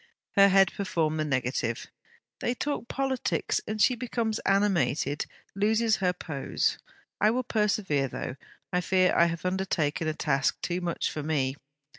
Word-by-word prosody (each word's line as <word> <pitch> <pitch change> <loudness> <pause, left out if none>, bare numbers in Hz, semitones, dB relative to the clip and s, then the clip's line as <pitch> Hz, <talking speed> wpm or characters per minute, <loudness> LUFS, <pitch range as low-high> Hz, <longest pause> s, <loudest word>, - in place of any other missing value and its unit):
Her 200 0 +6
head 195 -1 +5
performed 160 -5 -1
the 155 - 0
negative. 130 -4 -1 0.5
'They 240 - -1
talk 285 -3 -3
politics, 270 -1 -1
and 215 0 -3
she 250 - +5
becomes 230 -2 -2
animated, 165 -8 +1 0.3
loses 220 +2 +2
her 185 -2 +2
pose. 160 -6 -2 0.4
I 210 - +5
will 250 +3 0
persevere, 205 - +1
though 130 - -5 0.4
I 180 - +2
fear 185 +1 +3
I 170 - +6
have 170 +1 -3
undertaken 180 -5 0
a 155 - -1
task 140 -4 0
too 180 +1 -1
much 175 -1 -1
for 155 - -4
me.' 140 -3 0
185 Hz, 150 wpm, -28 LUFS, 155-215 Hz, 0.5 s, Her